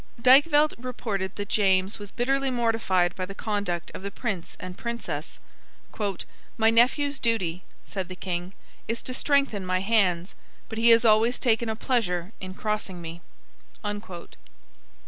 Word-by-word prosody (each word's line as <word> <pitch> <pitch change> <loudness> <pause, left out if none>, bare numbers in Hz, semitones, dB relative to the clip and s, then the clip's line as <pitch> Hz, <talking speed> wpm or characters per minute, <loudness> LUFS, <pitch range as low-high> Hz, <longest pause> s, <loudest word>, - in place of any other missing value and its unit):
Dykvelt 290 +5 +6
reported 215 -6 -3
that 205 0 -4
James 190 -1 +2
was 205 -1 -8
bitterly 270 +4 0
mortified 225 -8 +1
by 185 - -3
the 195 - -8
conduct 205 -6 -2
of - - -7
the 200 - -4
Prince 200 -5 -4
and 185 0 -7
Princess. 180 -11 -5 1.2
"My 225 0 +4
nephew's 270 +5 +3
duty," 185 -7 0 0.2
said 190 -3 -4
the 185 - -6
King, 180 0 -4 0.3
"is 230 +1 -3
to 255 - -2
strengthen 275 -7 +1
my 185 0 0
hands. 190 -4 +2 0.4
But 225 - -4
he 235 +1 +5
has 230 0 +6
always 225 +3 +4
taken 235 -2 +1
a 220 - -1
pleasure 205 -7 -1
in 185 0 -7
crossing 210 -4 -3
me." 165 0 -8
215 Hz, 145 wpm, -26 LUFS, 185-235 Hz, 1.2 s, Dykvelt